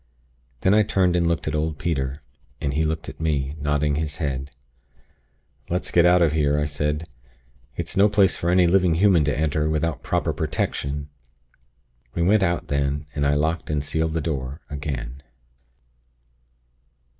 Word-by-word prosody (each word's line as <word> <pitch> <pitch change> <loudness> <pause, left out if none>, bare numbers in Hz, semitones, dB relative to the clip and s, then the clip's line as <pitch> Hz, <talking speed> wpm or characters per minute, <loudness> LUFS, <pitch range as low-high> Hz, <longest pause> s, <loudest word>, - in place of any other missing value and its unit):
"Then 95 - +3
I 110 - +6
turned 95 -3 +2
and 85 -1 +2
looked 85 -3 -1
at 75 - -1
old 75 0 -1
Peter, 70 -4 -2 0.4
and 70 - -2
he 80 +3 +1
looked 80 0 -2
at - - -9
me, 75 -3 -1
nodding 75 0 0
his 75 -1 -3
head. 70 -3 -3 1.2
"'Let's 90 +2 -2
get 85 0 +5
out 90 0 +5
of 80 - +3
here!' 75 -2 +1
I 75 - +1
said. 75 +2 -2 0.7
'It's - - -4
no 100 +2 +5
place 100 -2 +3
for 85 - -2
any 90 0 +5
living 90 -1 +3
human 90 -3 +4
to 75 - 0
enter, 75 0 0
without 80 -2 -1
proper - - -1
protection.' 70 +1 -2 1.1
"We 85 - +1
went 100 +4 +4
out 85 -2 0
then, 70 +1 -1
and 70 0 0
I 70 - +2
locked 80 +3 -1
and 75 -2 -1
sealed 80 +2 -1
the 80 - -1
door, 70 -1 -4
again. 70 -3 -5
75 Hz, 165 wpm, -23 LUFS, 70-85 Hz, 1.2 s, I